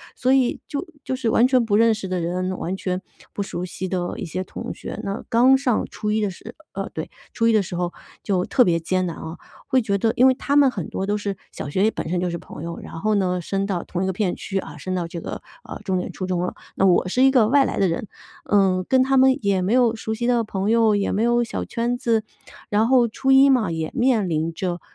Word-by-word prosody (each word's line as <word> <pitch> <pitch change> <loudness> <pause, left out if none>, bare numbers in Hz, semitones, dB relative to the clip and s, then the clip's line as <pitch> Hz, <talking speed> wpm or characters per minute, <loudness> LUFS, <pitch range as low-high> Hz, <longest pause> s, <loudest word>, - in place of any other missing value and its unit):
所 255 - +1
以 260 -2 +2
就 290 +2 -4 0.2
就 260 - -2
是 245 -3 0
完 230 +2 +4
全 255 -2 +3
不 205 -2 +1
认 225 +1 +5
识 215 -3 -5
的 185 -1 -2
人， 185 +2 -2
完 180 +3 -3
全 185 -1 -3 0.3
不 200 - -2
熟 180 -2 -5
悉 185 +1 -5
的 175 -1 -2
一 - - -4
些 175 +3 -4
同 - - -7
学。 - - -7
那 200 +1 -3
刚 255 +3 +5
上 255 -4 0
初 210 - -4
一 215 +1 +1
的 205 - 0
时 215 +5 -10 0.2
呃， - - -4
对， - - -5 0.2
初 230 - 0
一 - - +5
的 215 - +4
时 180 -2 -6
候 175 0 -1 0.3
就 185 -3 0
特 255 - +4
别 170 -6 +2
艰 185 +3 0
难 170 -2 -4
啊， 160 +1 -7 0.3
会 260 -2 +3
觉 200 -3 0
得 225 +3 +1
因 255 - +6
为 260 - +5
他 280 +2 -2
们 285 -2 +6
很 190 -9 -5
多 190 - -3
都 205 +1 0
是 200 -2 -4
小 - - -6
学 185 +6 -1
里 220 - +3
本 - - -5
身 180 +1 0
就 180 0 -1
是 170 - -3
朋 160 - -10
友， 170 0 -5
然 - - -9
后 215 +4 +1
呢 180 -2 +1
升 195 +3 -2
到 190 -4 -2
同 180 +1 -3
一 - - 0
个 190 - 0
片 190 -1 -1
区， 195 - -4
啊 160 -5 -8
升 185 +5 -4
到 175 -2 -2
这 170 0 -7
个， - - -6 0.2
呃， - - -8
重 190 -2 0
点 180 - -3
初 185 - -5
中 180 -1 -1
了， 180 - -2 0.2
那 195 - +2
我 185 -1 +4
是 250 +8 +2
一 270 - +6
个 245 -5 +4
外 275 +4 +5
来 - - -3
的 195 - +3
人， 170 +5 -3 0.4
嗯， 190 -3 +3
跟 260 -1 +4
他 270 +1 +1
们 260 +1 +5
也 195 -2 +2
没 185 +3 -1
有 245 -2 +3
熟 220 0 -4
悉 230 +2 -3
的 240 -2 +2
朋 200 -1 -2
友， 225 -2 +4
也 200 -1 0
没 205 - 0
有 240 0 +3
小 230 - -4
圈 240 +1 -2
子。 230 -3 +1 0.5
然 210 +2 +2
后 250 -2 +4
初 265 +4 -1
一 270 +1 +7
嘛 240 -10 +2
也 160 -1 -3
面 240 -6 +2
临 160 +1 -1
着， 175 +1 -3
205 Hz, 285 characters per minute, -22 LUFS, 180-240 Hz, 0.5 s, 一